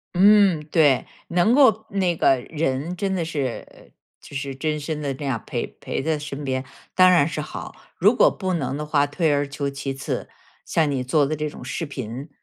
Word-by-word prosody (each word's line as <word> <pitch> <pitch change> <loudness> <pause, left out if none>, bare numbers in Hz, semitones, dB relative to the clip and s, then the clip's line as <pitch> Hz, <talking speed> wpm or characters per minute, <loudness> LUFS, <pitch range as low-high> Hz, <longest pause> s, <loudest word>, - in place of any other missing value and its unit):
嗯， 195 -3 +6
对。 145 -6 +4 0.2
能 175 +6 +3
够 225 -6 +5
那 185 -3 0
个 135 - +4
人 150 +4 -2
真 195 0 -1
的 175 - -1
是 145 -7 -5 0.3
就 140 - -13
是 135 0 -3
真 150 +2 -2
身 150 +1 -4
地 140 -2 -2
那 140 +2 -7
样 135 -4 0
儿 - - -22
陪 - - -2
陪 - - -3
在 155 0 0
身 145 -1 -6
边， 130 -1 -2 0.3
当 185 0 +7
然 170 -5 +5
是 165 - -4
好。 150 - -7 0.2
如 205 +6 +5
果 - - +6
不 185 -2 -3
能 135 -6 -2
的 150 +1 -4
话， 145 -1 +2
退 155 +2 +1
而 145 0 0
求 140 0 -3
其 140 0 -4
次， 135 0 -4 0.4
像 160 -3 +1
你 135 -2 -1
做 145 +3 +2
的 155 +3 -1
这 150 0 -3
种 - - -11
视 135 +6 -4
频， 130 +1 -6
150 Hz, 220 characters per minute, -23 LUFS, 135-170 Hz, 0.4 s, 当